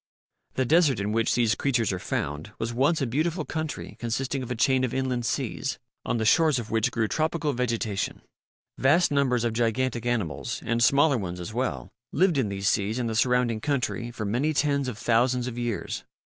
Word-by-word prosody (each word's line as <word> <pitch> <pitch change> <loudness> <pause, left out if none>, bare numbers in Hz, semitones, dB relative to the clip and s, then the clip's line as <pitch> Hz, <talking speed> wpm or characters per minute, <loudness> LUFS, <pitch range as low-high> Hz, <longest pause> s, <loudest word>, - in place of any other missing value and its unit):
The 130 - +1
desert 150 -4 +4
in 100 +1 -1
which 115 +1 +1
these 115 -3 +3
creatures 120 -7 0
are 95 - -3
found 75 +2 -3
was 115 +1 -3
once 140 +5 +2
a - - +2
beautiful 155 +6 -1
country 155 -3 -5
consisting 130 +3 -2
of 125 - -6
a 125 - -2
chain 130 +2 +2
of 125 - -1
inland 130 -3 -1
seas, 135 +3 -2 0.3
on - - -1
the 110 - -1
shores 155 +3 +4
of 115 -2 -5
which 110 -1 +2
grew 110 -1 0
tropical 155 +2 0
vegetation. 115 -4 -2 0.6
Vast 150 +7 +4
numbers 130 -4 +2
of 120 -1 0
gigantic 120 +1 0
animals 85 - -2
and 115 0 +1
smaller 140 0 +4
ones 90 -3 -5
as 90 +4 -6
well 125 +3 -2 0.2
lived 175 -3 +3
in 115 -6 0
these 100 0 -2
seas 105 +2 +1
and 120 -2 -1
the - - -3
surrounding 120 -1 +2
country 130 -3 -1
for 115 -2 -5
many 130 +9 0
tens 140 -2 +1
of 120 -5 -4
thousands 120 +2 +2
of 125 -2 -4
years. 120 -3 -3
120 Hz, 195 wpm, -26 LUFS, 115-140 Hz, 0.6 s, desert